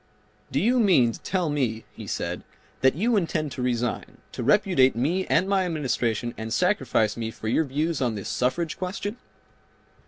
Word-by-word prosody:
"Do 135 - +1
you 245 - +3
mean 170 - +4
to - - -9
tell 185 -3 -1
me," 120 -6 -1
he - - -9
said, - - -3 0.4
"that 130 +1 +4
you 225 +8 +1
intend 160 -6 0
to 125 - -5
resign, 120 -2 -2
to - - -6
repudiate 145 - +4
me 165 +11 0
and 190 - +2
my 195 -1 +2
Administration 120 - -1
and 110 0 -5
sacrifice 130 - +1
me 115 -1 -3
for 110 - -7
your 155 +8 +2
views 150 +3 -1
on 120 -4 0
this 100 - -5
suffrage 155 +6 -1
question?" 205 +4 -4
140 Hz, 175 wpm, -25 LUFS, 120-185 Hz, 0.4 s, mean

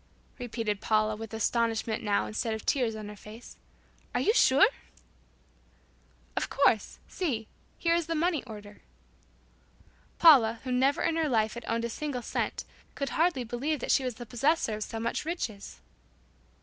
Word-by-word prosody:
repeated 225 -4 -3
Paula, 215 0 +2
with 225 +1 -8
astonishment 225 0 0
now 205 -2 +1
instead 220 +1 -2
of 220 - -8
tears 245 -6 +1
on 215 -1 -7
her 210 - -8
face, 215 +3 -12 0.6
"Are - - +3
you 435 - +3
sure?" 275 - +6 1.7
"Of - - -1
course. 265 -6 +2
See. 245 - -2 0.3
Here 335 -1 +2
is 340 -2 0
the 330 - -1
money 325 -2 +1
order." 210 -3 -11 1.4
Paula, 235 -9 +7
who 255 - -4
never 265 +3 +2
in 330 - +1
her 320 -2 +1
life 220 -3 +1
had 235 - -8
owned 230 0 0
a - - -3
single 275 -2 -4
cent, - - -2 0.3
could 275 - -2
hardly 325 -5 +1
believe 265 +6 -2
that - - -1
she 270 - +3
was 250 -3 -3
the 240 - -8
possessor 255 +2 +1
of 215 - -3
so 225 - -6
much 230 +1 -2
riches! 265 - -5
235 Hz, 160 wpm, -29 LUFS, 220-285 Hz, 1.7 s, Paula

